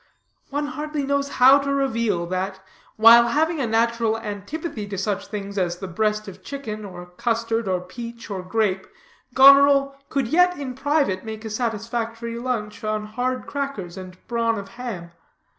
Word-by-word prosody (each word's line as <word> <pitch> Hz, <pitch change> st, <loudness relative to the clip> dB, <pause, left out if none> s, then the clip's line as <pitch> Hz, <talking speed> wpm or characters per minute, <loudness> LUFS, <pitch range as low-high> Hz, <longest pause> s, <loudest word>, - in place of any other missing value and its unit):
One 290 Hz, +1 st, -2 dB
hardly 300 Hz, 0 st, -4 dB
knows 280 Hz, 0 st, 0 dB
how 265 Hz, +2 st, +6 dB
to 280 Hz, 0 st, -2 dB
reveal, 230 Hz, -10 st, 0 dB
that, 185 Hz, +2 st, -3 dB, 0.4 s
while 230 Hz, +2 st, +8 dB
having 315 Hz, +6 st, +1 dB
a 255 Hz, -, 0 dB
natural 230 Hz, 0 st, +1 dB
antipathy 215 Hz, -, -5 dB
to 200 Hz, -1 st, -5 dB
such 200 Hz, +1 st, -2 dB
things 200 Hz, -1 st, -5 dB
as 175 Hz, -1 st, -1 dB
the 190 Hz, -, -6 dB
breast 210 Hz, +3 st, -1 dB
of 195 Hz, -, -10 dB
chicken, 220 Hz, -7 st, -6 dB
or 180 Hz, -3 st, -8 dB
custard, 230 Hz, +4 st, -1 dB
or 185 Hz, -1 st, 0 dB
peach, 230 Hz, +5 st, -9 dB
or 190 Hz, -2 st, -3 dB
grape, 190 Hz, 0 st, -1 dB, 0.5 s
Goneril 275 Hz, +1 st, +7 dB
could 275 Hz, -4 st, 0 dB
yet 360 Hz, +3 st, +4 dB
in 275 Hz, -3 st, -5 dB
private 275 Hz, -8 st, 0 dB
make 220 Hz, 0 st, -7 dB
a 220 Hz, -, -5 dB
satisfactory 230 Hz, +1 st, -3 dB
lunch 230 Hz, -5 st, -3 dB
on 215 Hz, 0 st, -2 dB
hard 250 Hz, +4 st, -2 dB
crackers 275 Hz, -12 st, -4 dB
and 185 Hz, -1 st, -9 dB
brawn 230 Hz, -1 st, 0 dB
of 195 Hz, -1 st, -7 dB
ham. 230 Hz, -8 st, -7 dB
230 Hz, 160 wpm, -23 LUFS, 200-270 Hz, 0.5 s, while